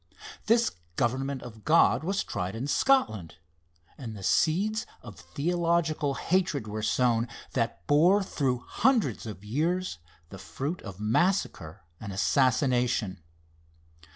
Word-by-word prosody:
This 230 +1 +3 0.2
government 130 +4 -1
of 110 -3 -11
God 155 -5 +4
was 195 +4 -1
tried 90 +3 -4
in 120 +4 -3
Scotland, 140 - +1 0.6
and 115 -5 -7
the 100 - -9
seeds 185 - +1 0.2
of 110 -6 -11
theological 160 - 0
hatred 165 - 0
were 105 +1 -4
sown, 120 +1 +1 0.3
that 115 -2 -2
bore, 175 +8 +4
through 130 -9 -2
hundreds 220 - +1
of 105 -2 -8
years, 165 - -1 0.3
the 95 - -10
fruit 140 - -5
of 100 -3 -9
massacre 110 - 0 0.2
and 100 -2 -7
assassination. 120 - +1
130 Hz, 120 wpm, -28 LUFS, 110-170 Hz, 0.6 s, God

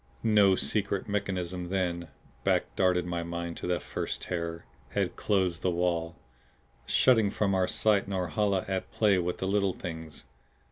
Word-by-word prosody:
No 105 -4 +5
secret 100 -1 -1
mechanism 95 -3 -2
then 90 -3 -1 0.4
back - - +1
darted 90 -2 +2
my 85 -1 -2
mind 85 0 -4
to - - -4
that 90 -1 0
first - - -4
terror 85 -1 -4 0.3
had - - 0
closed 95 -5 +1
the 95 - +1
wall, 85 -1 0 0.7
shutting 115 -5 +4
from 100 0 0
our 95 -1 +2
sight 105 -3 +2
Norhala 95 +1 0
at 95 -1 -3
play 100 -4 +3
with 90 0 -1
the 95 - -2
Little 100 -1 +2
Things. 80 -4 -7
95 Hz, 150 wpm, -29 LUFS, 85-100 Hz, 0.7 s, No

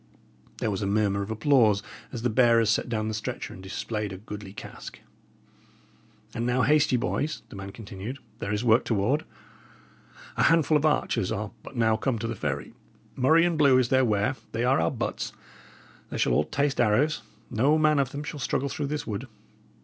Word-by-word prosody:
There 110 - -1
was 95 - -3
a 100 - -1
murmur 100 -1 +1
of 100 - -5
applause 110 -3 +3 0.3
as 120 -3 -6
the 125 - +2
bearers 115 -1 +4
set 115 - 0
down 110 -2 -1
the 110 - -2
stretcher 105 - -4
and 95 - -11
displayed 105 +2 -4
a 95 - -6
goodly 105 0 -8
cask. - - -10 1.3
"And 115 - -3
now 125 +1 +1
haste 150 +1 +4
ye, 125 - +3
boys," 150 +5 -2
the - - -11
man 95 0 -7
continued. 105 +4 -7 0.2
"There 100 - -3
is 105 +2 -1
work 115 0 +4
toward. 120 +8 0 1.1
A - - +3
handful 160 -2 +4
of 150 +1 +3
archers 150 - 0
are - - -3
but - - -11
now 110 -2 +3
come 130 0 -1
to 115 - -3
the 115 - -2
ferry; 105 - -4 0.4
murrey 160 +6 +4
and 170 -3 0
blue 140 -3 +6
is 125 -2 +2
their 130 0 +4
wear; 110 +3 +1 0.2
they 115 +1 -1
are 130 +2 +3
our - - +2
butts 120 -3 -3 0.8
they - - -5
shall - - +2
all 75 +5 +3
taste 140 -2 0
arrows 125 +8 +2 0.3
no 135 +7 +3
man 155 -1 +3
of 135 -3 +1
them 145 +2 -6
shall 150 0 -6
struggle 140 +1 -1
through 145 0 -3
this 145 0 -3
wood. 110 +4 -4
120 Hz, 195 wpm, -27 LUFS, 105-140 Hz, 1.3 s, blue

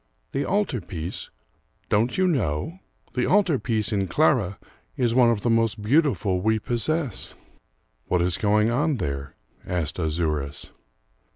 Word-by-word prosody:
"The 140 - -1
altar 195 - 0
piece? 85 0 -5 0.6
Don't 115 +4 +2
you 185 - +3
know? 130 - -1 0.3
The 125 -1 0
altar 185 -8 +3
piece 110 -3 -1
in 100 -2 0
Clara 110 - +2 0.4
is 120 -3 +2
one 125 -1 +5
of 115 -3 +1
the 120 - 0
most 115 -1 +2
beautiful 105 - +2
we 110 +2 +2
possess." 120 - -1 0.7
"What 90 - +2
is 90 -2 +2
going 105 +2 +3
on 145 +3 +1
there?" 70 - -4 0.3
asked 85 -2 -3
Azouras. 75 -3 -2
110 Hz, 135 wpm, -25 LUFS, 90-130 Hz, 0.7 s, one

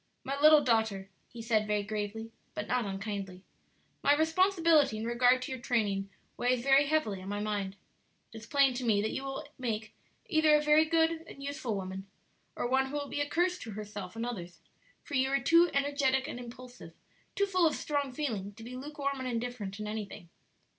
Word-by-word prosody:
"My 275 0 -2
little 305 -1 +8
daughter," 220 -6 0 0.2
he 235 -1 -9
said 215 -2 +1
very 210 -1 0
gravely, 215 +2 -4 0.2
but 210 - -3
not 250 -2 0
unkindly, 195 -2 -5 0.6
"my 285 - +5
responsibility 325 - +3
in 220 - -4
regard 245 +2 +3
to 255 - -6
your 260 -2 -5
training 205 -5 0 0.3
weighs 245 0 +1
very 275 +1 +5
heavily 250 -11 0
on 190 - -7
my 205 0 -2
mind; 205 -2 -2 0.6
it - - -8
is 220 - -13
plain 275 -1 +4
to 250 +1 -4
me 220 -4 +3
that 220 - -1
you 270 - -4
will 270 +2 -5
make 220 -3 -3 0.3
either 315 -2 +4
a - - +5
very 300 +1 +5
good 325 0 +2
and 275 - -10
useful 275 -6 -3
woman, 190 0 -5 0.5
or - - -1
one 265 +1 +2
who 265 - -9
will 285 -1 -3
be 290 - -2
a 290 - -2
curse 360 +2 +1
to 225 - -7
herself 205 -2 -7
and 230 +1 -3
others; 180 -8 -6 0.4
for 290 - -11
you 265 -1 +2
are 275 0 +2
too 335 +7 +5
energetic 280 -1 +1
and 245 - -6
impulsive, 245 +1 -11 0.4
too 400 - +2
full 370 -4 +3
of 305 - 0
strong 285 -2 -2
feeling 220 -8 -3
to 225 - -11
be 245 +2 -8
lukewarm 280 0 -4
and 260 - -3
indifferent 230 -4 -4
in 210 - -4
anything. 210 -4 -6
245 Hz, 200 wpm, -31 LUFS, 210-285 Hz, 0.6 s, little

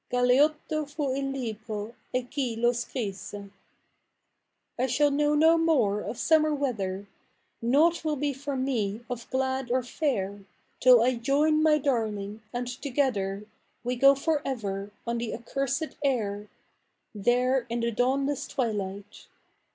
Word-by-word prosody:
Galeotto 295 +5 +2
fu 290 -3 -2
il 275 0 -2
libro, 220 -4 -5 0.2
e 255 0 0
chi 250 -2 -3
lo 240 +1 +3
scrisse. 205 -4 -5 1.3
I 255 - +2
shall 290 +4 +3
know 295 +1 +2
no 325 +2 +5
more 260 -12 +2
of - - -5
sumvier 310 +2 +3
weather, 200 -8 -2 0.6
Noiight 310 +9 +3
will 310 -1 0
be 290 0 -1
for 280 +1 -5
me 230 -5 -1
of 240 -1 -5
glad 260 -1 -1
or 255 +1 +1
fair. 220 -7 -2 0.4
Till 250 -2 +7
I 255 +2 +3
join 290 +5 +2
my 310 -1 +5
darling, 220 -7 -2
and 245 0 -3
together 245 -7 -1 0.4
We 245 +1 -1
go 275 +3 +6
for 295 +2 0
ever 205 -6 -3 0.2
on 235 0 -1
the 230 -1 -3
accursed 275 +6 -3
air,^ 210 -6 -1 0.7
There 245 +4 +1
in 235 0 -2
the 235 0 0
dawnless 270 +4 0
twilight. 205 -5 -4
250 Hz, 135 wpm, -27 LUFS, 220-280 Hz, 1.3 s, Till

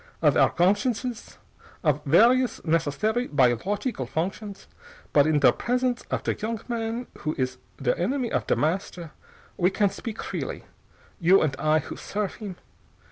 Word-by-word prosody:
Of - - +3
our - - +5
gonsciences. 220 +6 0 0.5
Of 150 -2 +1
various 235 - +4
necessary 165 - 0
biological 145 - 0
functions. 195 - -4 0.5
But 145 0 +5
in 150 -2 +2
der 135 - +7
presence 250 0 -1
of - - -2
der - - 0
young 225 +1 -3
man 235 0 -3
who 155 +1 -2
is 130 -1 -2 0.2
der 130 -3 +1
enemy 245 +7 -1
of - - -1
Der - - +3
Master 170 0 -2 0.5
we 180 0 +3
can 200 0 +1
speak 225 -2 -7
freely, - - -5 0.6
you 185 +2 +5
and 140 -4 0
I 155 0 +3
who 155 - -5
serf 205 -1 -4
him. 205 -4 -7
195 Hz, 150 wpm, -26 LUFS, 155-225 Hz, 0.6 s, der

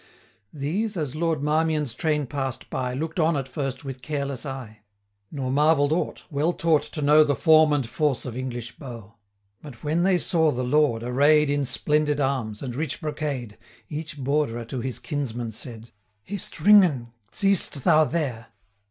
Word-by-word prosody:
85 150 - -13
These, 200 +8 -1
as 150 -4 -3
Lord 160 -2 0
Marmion's 155 -3 +1
train 150 +1 0
pass'd 135 -1 -4
by, 125 -1 -2
Look'd 160 +5 -3
on 160 -1 +3
at 135 -1 -3
first 135 0 -4
with 135 -1 -6
careless 140 -1 -4
eye, 125 -5 -7 0.5
Nor 130 -3 -3
marvell'd 145 +1 +3
aught, 165 - -1
well 155 +4 +1
taught 165 -3 +2
to 150 - -6
know 150 +2 +7
The 145 -2 +1
form 155 -2 +5
and 140 -5 +1
force 145 +2 -1
of 125 -3 -5
English 120 -2 -5
bow. 115 -6 -9 0.5
But 140 -6 -12
when 155 +3 +1
they 185 0 +3
saw 165 -3 +2
the 125 -3 -1
Lord 125 -3 +2
array'd 145 +5 +4
90 - - +2
In 145 -1 0
splendid 150 +2 +1
arms, 130 -6 -1
and 125 -3 -5
rich 150 0 -2
brocade, 145 -8 -4 0.3
Each 155 0 -5
Borderer 135 -4 -1
to 130 - -3
his 130 +1 -3
kinsman 120 -6 -4
said, 115 0 -8 0.3
'Hist, 195 - -4
Ringan! 155 - +5 0.2
seest 195 -8 +1
thou 155 +1 +5
there! 135 -9 -3
145 Hz, 170 wpm, -25 LUFS, 125-155 Hz, 0.5 s, know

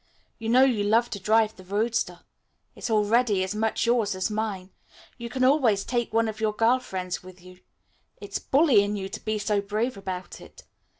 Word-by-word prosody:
You 225 0 -4
know 255 +3 +6
you 240 -6 +2
love 225 +4 +2
to 200 - -4
drive 220 +2 +2
the 185 - -14
roadster. 205 -2 -1 0.5
It's - - -6
already 215 -1 +2
as 190 +2 -3
much 220 +2 0
yours 230 -4 +1
as 185 +3 -2
mine. 205 -3 -3 0.5
You 235 0 -6
can 255 +2 -2
always 255 -7 +3
take 240 -2 -1
one 225 0 +2
of 215 0 -5
your 215 -1 +1
girl 230 +4 +3
friends 185 -7 -5
with 185 0 -14
you. 180 0 -15 0.6
It's - - -5
bully 275 -6 +4
in 205 +1 -2
you 195 -1 -5
to - - -8
be 215 0 -1
so 210 0 0
brave 215 +4 -2
about 185 -2 -6
it. - - -15
215 Hz, 195 wpm, -26 LUFS, 195-235 Hz, 0.6 s, know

